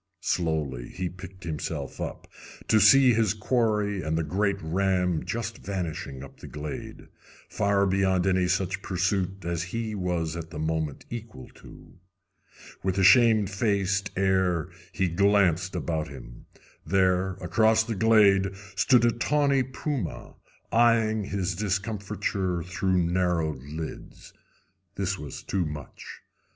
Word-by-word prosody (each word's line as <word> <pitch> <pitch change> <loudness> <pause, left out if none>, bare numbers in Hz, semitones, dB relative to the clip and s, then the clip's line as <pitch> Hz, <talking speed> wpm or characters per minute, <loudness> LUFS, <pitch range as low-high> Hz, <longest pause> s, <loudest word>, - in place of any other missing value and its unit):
Slowly 75 -8 -1
he 90 -1 -4
picked 95 +2 -11
himself 80 -3 -4
up, - - -6 0.4
to 110 - +4
see 125 +5 +7
his 110 -2 +2
quarry 105 -3 0
and 80 0 -1
the 80 - 0
great 100 +5 0
ram 90 0 0
just 100 +4 -4
vanishing 85 -8 -5
up 70 - -13
the - - -10
glade, 75 0 -7 0.4
far 100 -1 +2
beyond 95 -1 +2
any 95 -1 +2
such 95 +1 -1
pursuit 95 0 -1
as 85 -1 -1 0.2
he 110 -2 -3
was 90 -5 -2
at 85 -1 -6
the 80 - -8
moment 80 -2 -2
equal 115 - -8
to. - - -16 0.8
With 95 0 -1
a 95 - +3
shamefaced 100 -2 +3
air 95 -4 +1 0.2
he 95 -1 0
glanced 95 -1 +2
about 80 -2 -2
him. - - -12 0.4
There, 95 -1 +2
across 110 +5 +2
the 115 0 -3
glade, 100 -3 +4 0.2
stood 125 -3 +4
a 120 - +4
tawny 140 +3 +2
puma, 130 - -4 0.4
eyeing 115 -2 +3
his 95 -3 -2
discomfiture 100 -2 -2
through 90 +1 0
narrowed 85 -5 0
lids. 75 +4 -8 0.6
This 100 0 -2
was 75 -2 -8
too 90 -4 -1
much. 75 -1 -9
95 Hz, 130 wpm, -27 LUFS, 85-105 Hz, 0.8 s, see